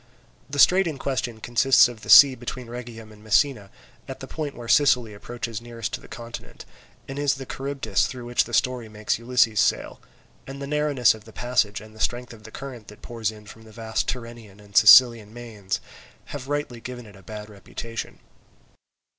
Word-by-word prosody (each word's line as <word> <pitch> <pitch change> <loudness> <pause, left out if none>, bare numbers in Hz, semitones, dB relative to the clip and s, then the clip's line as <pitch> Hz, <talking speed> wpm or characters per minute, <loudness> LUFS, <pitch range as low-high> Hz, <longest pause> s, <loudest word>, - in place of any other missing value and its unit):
The 140 - -5
strait 180 +7 +5
in 155 -4 -4
question 125 -4 -3
consists 120 +4 +4
of 120 -3 -10
the - - -11
sea 140 -2 +10
between 125 0 -7
Rhegium 115 -2 -9
and 105 0 -17
Messina, 110 -1 +1 0.4
at - - -8
the - - -7
point 150 -3 -5
where 120 -1 -9
Sicily 125 -5 +3
approaches 115 +1 -6
nearest 115 -2 -6
to - - -4
the - - -14
continent, 115 - -10 0.4
and 135 +1 -6
is 145 -1 +1
the 135 0 -8
Charybdis 135 -7 -1
through 125 -2 -8
which 120 0 +1
the 120 - -11
story 125 -4 0
makes 105 +1 -2
Ulysses 115 -2 +2
sail; - - 0 0.5
and 135 +1 -8
the 140 - -5
narrowness 145 -4 +2
of 110 -1 -14
the 110 - -13
passage 110 -4 -1
and 110 0 -14
the - - -15
strength 120 +1 -2
of 110 -2 -15
the - - -9
current 125 -5 -9
that 105 - -15
pours 115 -3 -3
in 105 -1 -11
from 110 +2 -13
the 110 - -15
vast 110 0 -3
Tyrrhenian 115 -5 -7
and 100 -1 -18
Sicilian 115 -1 +7
mains, 110 -5 -5 0.5
have 140 -2 -7
rightly 145 -5 -3
given 125 -1 -8
it 105 -2 -15
a 95 - -15
bad 105 +2 -9
reputation. 115 +2 -8
120 Hz, 195 wpm, -24 LUFS, 110-130 Hz, 0.5 s, sea